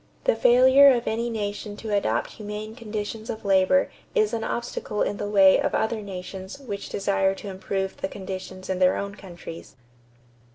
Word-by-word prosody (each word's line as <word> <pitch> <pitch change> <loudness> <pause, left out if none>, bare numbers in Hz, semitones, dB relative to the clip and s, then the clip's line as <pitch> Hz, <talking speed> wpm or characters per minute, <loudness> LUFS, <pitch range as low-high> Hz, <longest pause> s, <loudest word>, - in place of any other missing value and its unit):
The - - +3
failure 260 +3 +7
of 240 -2 0
any 230 +2 -1
nation 205 -1 -4
to 215 -1 -2
adopt 120 - 0
humane 210 0 -6
conditions 220 -1 -5
of 220 - -5
labor 195 +8 +3 0.2
is 430 -2 +2
an 225 - -1
obstacle 235 -3 -2
in 205 - -2
the 205 - -3
way 195 -2 +6
of - - 0
other 220 0 0
nations 190 +2 -7
which 215 -8 -6
desire 195 -1 +1
to 200 - -8
improve 190 0 -3
the - - -2
conditions 185 -1 -7
in 190 -1 -2
their 185 0 +4
own 200 0 -4
countries." 175 -6 -10
205 Hz, 170 wpm, -25 LUFS, 190-225 Hz, 0.2 s, failure